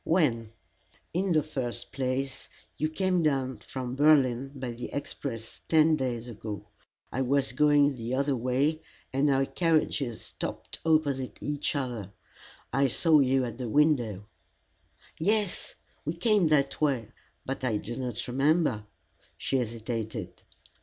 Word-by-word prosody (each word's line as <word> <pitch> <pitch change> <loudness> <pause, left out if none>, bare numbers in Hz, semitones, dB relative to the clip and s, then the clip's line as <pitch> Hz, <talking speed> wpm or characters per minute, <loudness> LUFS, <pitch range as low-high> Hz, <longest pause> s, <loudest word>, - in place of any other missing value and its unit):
"When?" 120 -10 +1 0.6
"In 185 +2 +1
the 155 -3 +4
first 130 -6 -4
place, 135 0 -2 0.3
you 155 - 0
came 185 +2 +1
down 135 -4 +1
from 130 -1 -5
Berlin 135 -3 +4
by 130 -2 -4
the 120 +1 -6
express 125 -5 -5
ten 160 0 +5
days 125 -4 -2
ago. 105 -2 -6 0.5
I 130 - -1
was 135 +1 +1
going 145 +1 +4
the 120 0 -3
other 140 +1 +1
way, 130 +6 +1 0.3
and 140 +2 +3
our 135 0 +3
carriages 155 -7 +1
stopped - - -6
opposite 145 -5 +1
each 145 +2 -2
other. 120 -8 -3 0.6
I 135 +1 +4
saw 155 +4 +4
you 130 -1 +3
at 120 0 -6
the 125 -3 -3
window." 120 -8 +2 0.9
"Yes 205 +2 0 0.3
we 155 - -2
came 200 0 +3
that 140 -2 +2
way, 130 -7 +1 0.3
but 135 0 -4
I 115 -4 +1
do 120 +3 -5
not 125 -3 -4
remember 135 -4 +2 0.2
" - - -33
She 135 - 0
hesitated. 110 -5 -4
135 Hz, 140 wpm, -29 LUFS, 120-150 Hz, 0.9 s, ten